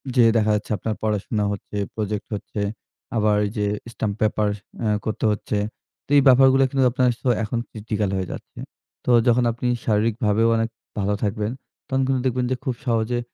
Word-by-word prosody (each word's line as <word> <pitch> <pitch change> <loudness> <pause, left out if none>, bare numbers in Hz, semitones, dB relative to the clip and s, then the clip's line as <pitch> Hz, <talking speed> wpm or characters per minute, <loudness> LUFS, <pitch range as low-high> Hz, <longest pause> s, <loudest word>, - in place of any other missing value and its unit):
যে 120 - +6
দেখা 110 -1 +3
যাচ্ছে, 105 +1 -4
আপনার 110 +1 -3
পড়াশোনা 105 0 0
হচ্ছে, 105 0 -6 0.2
প্রজেক্ট 105 -1 -3
হচ্ছে, 105 +1 -5 0.6
আবার 105 -1 +3
এই 100 - -3
যে 105 - +1 0.3
স্টাম্প 105 -3 -2
পেপার 110 -1 +2 0.3
অ্যা 110 -2 +1
করতে 110 0 -2
হচ্ছে। 105 0 -2 0.5
তো - - -36
এই - - +7
ব্যাপারগুলো 135 +1 +6
কিন্তু 135 0 +1
আপনার 125 0 +2
সো - - -3 0.2
এখন 110 +3 -2
ক্রিটিক্যাল 105 -2 -2
হয়ে 95 -1 -3
যাচ্ছে। - - -9 0.5
তো - - -2 0.2
যখন 120 +1 +4
আপনি 120 +2 -3 0.2
শারীরিকভাবেও 110 0 +2
অনেক 115 0 0 0.3
ভালো 100 +1 +1
থাকবেন, 105 +1 -1 0.4
তখন 135 -1 0
কিন্তু 130 -1 +1
দেখবেন 125 -1 +1
যে - - +2
খুব 130 - -1
সহজে 115 0 +1
110 Hz, 175 wpm, -23 LUFS, 105-125 Hz, 0.6 s, এই